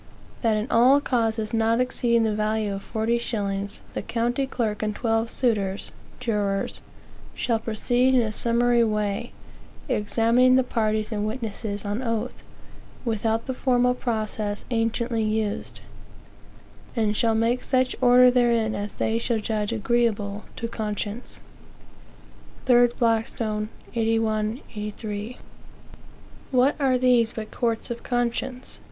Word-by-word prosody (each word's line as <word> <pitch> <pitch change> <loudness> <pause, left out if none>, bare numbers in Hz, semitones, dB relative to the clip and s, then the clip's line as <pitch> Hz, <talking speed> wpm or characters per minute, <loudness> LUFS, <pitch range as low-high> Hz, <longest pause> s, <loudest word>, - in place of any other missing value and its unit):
That 225 -3 +2
in 215 - -1
all 255 +5 +6
causes 225 -5 -1
not 225 +1 +2
exceeding 240 -2 +2
the 220 -1 +1
value 215 -1 0
of 195 - -5
forty 225 +2 -1
shillings, 200 -3 -3
the - - -2
county 240 +3 -1
clerk 220 -5 -2
and 215 -1 -1
twelve 225 0 0
suitors 205 -7 -1 0.3
(jurors) 205 -5 -1 0.6
shll 230 -2 0
proceed 245 +4 +1
in 250 - +5
a 215 - -2
summary 235 +2 +2
way, 210 +1 -1 0.6
examining 235 +1 +3
the 260 - +4
parties 215 -2 -1
and 210 -1 -1
witnesses 215 -3 -4
on 205 +4 -2
oath, 230 0 -3 0.6
without 225 0 0
the 260 - -2
formal 250 -1 +2
process 215 -4 -3
anciently 230 0 0
used; 215 -1 -2 1.1
and 215 -3 +1
shall 225 +1 +2
make 230 +3 +1
such 255 -1 +1
order 250 0 +7
therein 235 -3 +2
as 205 +1 -4
they 225 +1 0
shall 235 0 0
judge 215 -1 -2
agreeable 220 -2 0
to 230 - -3
conscience." 215 0 -5 1.2
3 245 -1 +6
Blackstone, 220 -2 0 0.2
81 225 0 0
83. 210 +2 -5 1.1
What 260 +2 +3
are 265 -3 +3
these 245 -2 +3
but 215 -1 -6
courts 230 -1 -1
of 235 - -5
conscience? 245 +1 -2
225 Hz, 125 wpm, -25 LUFS, 215-245 Hz, 1.2 s, order